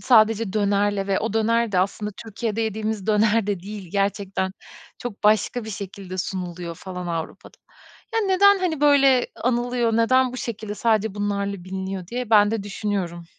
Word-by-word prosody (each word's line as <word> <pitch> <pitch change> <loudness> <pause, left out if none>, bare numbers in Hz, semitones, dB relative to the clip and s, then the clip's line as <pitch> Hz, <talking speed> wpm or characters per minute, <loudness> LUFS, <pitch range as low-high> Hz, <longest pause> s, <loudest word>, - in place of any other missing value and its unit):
sadece 225 -3 +4
dönerle 205 -1 +1
ve 195 -1 +1
o 225 - -2
döner 230 0 +1
de 185 - +2
aslında 200 +3 -1
Türkiye'de 225 0 -3
yediğimiz 220 -2 -2
döner 215 0 +3
de 200 -3 -1
değil, 200 -1 -8
gerçekten. 195 -1 -1 0.5
Çok 240 -4 -7
başka 215 +3 +2
bir 220 - -6
şekilde 195 -2 -7
sunuluyor 180 -2 -4
falan 180 +1 -7
Avrupa'da. 165 -2 -5 0.6
Ya 450 - +3
neden, 400 0 +5
hani, 345 -6 -1
böyle 275 -3 +5 0.2
anılıyor, 240 -1 +1
neden 255 +2 +3
bu - - -6
şekilde 220 -4 -5
sadece 220 -2 +1
bunlarla 200 -2 -2
biliniyor, 190 0 -5
diye 245 +3 -4
ben 205 -2 +6
de 225 -2 -2
düşünüyorum. 195 -4 -3
210 Hz, 155 wpm, -23 LUFS, 195-230 Hz, 0.6 s, ben